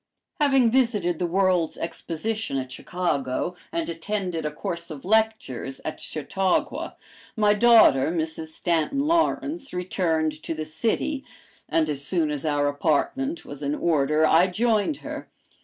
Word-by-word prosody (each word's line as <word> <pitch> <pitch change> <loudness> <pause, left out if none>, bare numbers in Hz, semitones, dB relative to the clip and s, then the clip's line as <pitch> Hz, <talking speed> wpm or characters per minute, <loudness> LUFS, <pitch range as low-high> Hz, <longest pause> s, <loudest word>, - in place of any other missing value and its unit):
Having 270 -5 +4
visited 210 -10 +1
the 175 - 0
World's 180 -2 +1
Exposition 170 +2 -3
at 130 -1 -4
Chicago 170 0 -2 0.2
and 335 0 -2
attended 170 -1 -3
a - - -4
course 170 +3 -5
of 150 -2 -8
lectures 220 - 0
at 155 - -4
Chautauqua, 180 +5 -1 0.4
my 210 -1 +4
daughter, 210 - +6
Mrs. 160 -1 -2
Stanton 170 - 0
Lawrence, 325 - 0
returned 160 -4 -1
to 165 - -4
the 155 0 -4
city, 235 - -1 0.5
and 160 -1 +2
as 140 -2 -2
soon 160 -1 +1
as 150 +1 -2
our 145 -1 +1
apartment 165 - 0
was 145 0 -9
in 145 +1 -1
order 155 -1 +2
I 165 +4 +5
joined 220 - +1
her. - - -6
170 Hz, 140 wpm, -25 LUFS, 155-220 Hz, 0.5 s, daughter